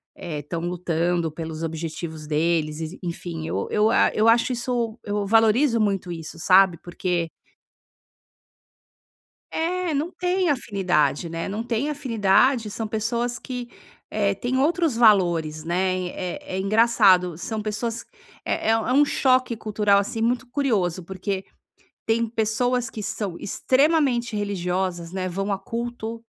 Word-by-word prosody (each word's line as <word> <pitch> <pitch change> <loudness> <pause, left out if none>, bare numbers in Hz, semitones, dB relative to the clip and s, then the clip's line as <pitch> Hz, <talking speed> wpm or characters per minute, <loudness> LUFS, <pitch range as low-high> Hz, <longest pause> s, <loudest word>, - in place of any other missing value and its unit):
eh, 155 -3 -6
estão 165 +3 -5
lutando 175 -1 -1
pelos 160 0 -6
objetivos 160 -1 -5
deles 155 0 0
e - - -3
s 165 +5 -9
enfim, 170 -2 -5
eu - - -2
eu 215 +1 +3
a - - +4
eu 215 +1 +2
acho 235 +2 +4
isso 240 -2 -2
eu 205 0 -2
valorizo 225 +4 +4
muito 195 -4 0
isso 165 -1 -7
sabe, 185 +1 +5
porque 175 -1 -2 2.2
É, 350 +1 -1
não 300 +5 -1
tem 360 -1 0
afinidade, 180 - 0
né. 165 0 -4
Não 210 +3 -3
tem 240 +4 -1
afinidade, 235 -3 +2
são 220 +1 -4
pessoas 235 +3 -2
que, 245 -2 -6 0.4
eh, 200 -2 +1
tem 245 +6 -2
outros 315 0 +2
valores, 175 -9 +3
né. 185 +2 0
É 180 +1 -5
é - - -1
engraçado, 190 -5 +4
são 215 +4 -4
pessoas, 225 +2 -3 0.4
é - - -2
é - - +6
é 225 +2 +1
um 290 +2 +5
choque 255 -3 +2
cultural, 210 -2 +2
assim, 215 +3 -3
muito 245 +3 0
curioso, 210 - 0
porque 190 +2 -4 0.6
tem 230 +1 +2
pessoas 230 +2 0
que 215 - -7
são 195 -3 -3
extremamente 260 -1 +1
religiosas, 185 -3 -2
né. 185 -1 -3
Vão 195 +3 -2
a 195 - -1
culto, 230 +1 -5
210 Hz, 140 wpm, -24 LUFS, 175-235 Hz, 2.2 s, é